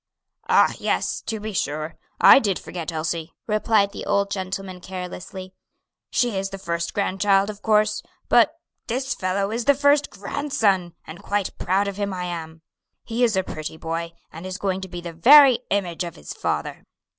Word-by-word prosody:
"Ah, - - +5
yes! - - -1
to 220 - -2
be 215 0 -5
sure, 155 -1 -2 0.3
I - - +9
did 200 -7 0
forget 170 -1 -6
Elsie," 160 0 -3
replied 215 -2 +2
the - - -7
old 200 0 +1
gentleman 190 -1 -4
carelessly; 185 0 -7 0.6
"she 240 -4 +1
is 195 0 -2
the 195 - -7
first 170 -2 -3
grandchild 195 0 +2
of 205 0 -14
course; 215 -1 +2 0.3
but 265 +7 +4 0.3
this 260 +3 -1
fellow 195 +2 -1
is 230 +1 -2
the 285 - +5
first 285 +1 +3
grandson, 200 - -1
and 160 +5 -10
quite 205 -1 -2
proud 195 +2 +1
of 200 -1 -4
him 200 -2 -2
I 180 - -4
am. 165 -2 -6 0.4
He 235 +2 -1
is 225 -4 +3
a 190 - +2
pretty 155 -2 -6
boy, 165 +1 -4 0.2
and 165 +4 -8
is 185 0 -5
going 190 -2 -2
to 190 - -6
be 175 0 -6
the 170 -1 -7
very 265 - +8
image 185 -4 -1
of 170 -1 -7
his 75 - -8
father." - - -3
195 Hz, 180 wpm, -23 LUFS, 175-215 Hz, 0.6 s, I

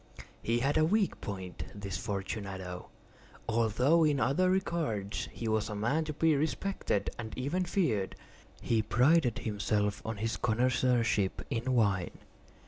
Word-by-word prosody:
He 115 +1 +1
had 140 +5 +2
a - - +4
weak 200 +5 +1
point—this 95 0 -6
Fortunato—although 105 - -2
in 150 -3 +3
other 180 +8 +2
regards 150 - -1
he 115 - -5
was 110 -1 0
a 105 - -4
man 120 +10 0
to 155 - -4
be 160 +1 +3
respected 155 - -1
and 110 -2 -6
even 155 +9 -1
feared. 125 - 0 0.5
He 115 -1 +2
prided 125 +3 +3
himself 105 -1 -1
on 110 -1 -4
his 110 +2 -2
connoisseurship 120 -3 +1
in 125 +1 0
wine. 100 -6 +1
115 Hz, 130 wpm, -31 LUFS, 105-145 Hz, 0.5 s, a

